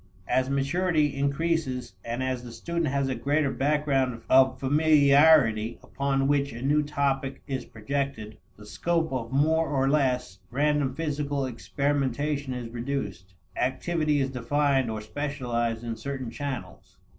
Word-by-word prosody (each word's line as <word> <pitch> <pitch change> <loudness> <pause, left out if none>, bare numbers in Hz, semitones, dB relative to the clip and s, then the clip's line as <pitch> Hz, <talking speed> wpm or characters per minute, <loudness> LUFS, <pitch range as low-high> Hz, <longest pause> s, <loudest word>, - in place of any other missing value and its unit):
As 130 0 +1
maturity 150 +2 +1
increases 140 - -1
and 120 +2 -3
as 130 -1 -2
the 120 - -9
student 170 +6 -2
has 140 0 0
a 130 - -1
greater 140 +4 0
background 135 -4 0
of 130 0 +5
familiarity 140 -5 +4
upon 135 -1 0
which 140 0 +1
a 120 +2 -7
new 145 +2 +3
topic 140 -2 -1
is 130 -2 -4
projected, 115 -2 -4 0.2
the 105 - -13
scope 165 +6 -1
of 120 -2 -3
more 160 +4 +2
or 135 -2 +1
less 125 -9 +1
random 145 +1 +1
physical 145 -3 -2
experimentation 140 +2 -1
is 120 -2 -5
reduced. 115 -7 -5 0.2
Activity 150 +4 0
is 135 -1 0
defined 135 +1 +1
or 110 -1 -4
specialized 120 -2 -2
in 115 -1 -3
certain 130 +1 -5
channels. 140 +1 -6
135 Hz, 135 wpm, -27 LUFS, 125-145 Hz, 0.2 s, of